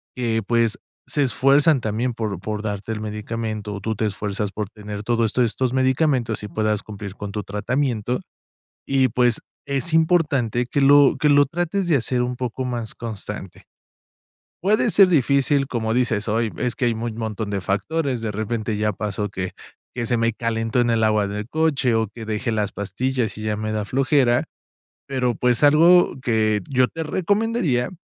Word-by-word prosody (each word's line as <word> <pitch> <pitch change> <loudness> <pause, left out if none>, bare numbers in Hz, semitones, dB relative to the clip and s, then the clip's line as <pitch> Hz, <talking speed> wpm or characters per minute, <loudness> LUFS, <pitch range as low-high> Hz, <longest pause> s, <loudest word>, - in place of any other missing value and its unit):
que 115 -3 0
pues, 115 0 +1 0.3
se 145 - -1
esfuerzan 140 +1 +4
también 115 +3 -2
por, 105 -5 -3
por 105 +2 -4
darte 105 +1 -3
el 105 - -5
medicamento, 105 -1 -4
tú 110 +2 -3
te 110 +1 0
esfuerzas 105 0 -3
por 105 -1 -5
tener 105 -1 -7
todo 115 +1 +1
esto 120 +3 +2
estos 120 +2 0
medicamentos 130 -3 +1
y 105 - -6
puedas 105 +2 -1
cumplir 100 -2 -8
con 100 -1 -6
tu 105 0 -4
tratamiento, 120 +2 -1 0.6
y 135 -1 +3
pues, 120 -1 +1 0.2
es 140 +3 -1
importante 145 - +2
que 140 +3 -1
lo 140 0 +6
que 150 - +2
lo 145 0 +6
trates 175 +5 -2
de 165 - +3
hacer 125 -1 0
un 125 0 -2
poco 130 +1 -4
más 120 -3 -3
constante 105 -4 -6 1.0
puede 215 +5 +3
ser 195 -2 +6
difícil, 140 -3 +2
como 110 -3 -2
dices: 120 -4 0
"Ay, 110 +1 +1
es 125 -3 -1
que 125 - -1
hay 115 - +1
muy 115 +1 -4
montón 110 -1 -4
de 100 -2 -2
factores, 130 - -1
de 110 -2 -2
repente 110 +1 -2
ya 105 0 +1
pasó 105 0 -3
que 95 -2 -4 0.4
que 120 -2 -3
se 120 0 +1
me 115 0 +2
calentó 115 +1 -1
en 120 - +2
el 110 -1 +2
agua 105 -2 +2
del 105 +2 -5
coche 150 -6 +1
o 110 0 +1
que 110 +3 -10
dejé 110 +3 -2
las 105 -2 -1
pastillas 120 +5 -2
y - - -7
ya 105 -1 -1
me 110 0 -3
da 105 -1 -2
flojera", 130 -1 +2 0.6
pero, 125 -4 -1
pues, 125 +3 +2
algo 165 +5 +6
que 110 -4 +1
yo 130 -2 +3
te 165 0 -5
recomendaría 185 - 0
115 Hz, 180 wpm, -22 LUFS, 105-135 Hz, 1.0 s, lo